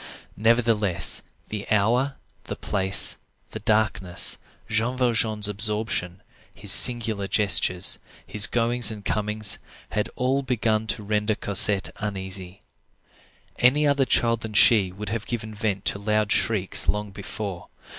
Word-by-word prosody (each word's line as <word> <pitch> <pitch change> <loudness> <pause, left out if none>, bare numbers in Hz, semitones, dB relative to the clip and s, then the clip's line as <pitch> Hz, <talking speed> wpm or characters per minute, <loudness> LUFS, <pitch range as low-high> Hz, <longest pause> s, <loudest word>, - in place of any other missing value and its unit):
Nevertheless, 110 -4 +1 0.3
the 105 -1 -7
hour, 120 +7 0 0.3
the - - -6
place, 95 -1 +3 0.3
the - - -7
darkness, 105 -5 +1 0.3
Jean 115 +4 -2
Valjean's 110 -4 0
absorption, 105 -3 -2 0.3
his - - +2
singular 110 -5 +6
gestures, 90 -3 +1 0.3
his 105 0 +3
goings 120 0 +2
and 105 -2 -8
comings, 105 0 +1 0.6
all 130 +2 -1
had 140 - -7
begun 110 -3 -1
to 110 - -3
render 105 +1 -1
Cosette 100 -1 +2
uneasy. 95 -2 -6 1.0
Any 140 +5 +3
other 140 -2 +1
child 115 -2 0
than 110 -1 -8
she 100 -2 +4
would 100 +2 -8
have 115 0 -5
given 110 -2 -6
vent 100 -2 -4
to 100 - -1
loud 105 0 -1
shrieks 100 -4 0
long 105 -1 -2
before. 100 -1 -8
105 Hz, 125 wpm, -23 LUFS, 100-115 Hz, 1.0 s, singular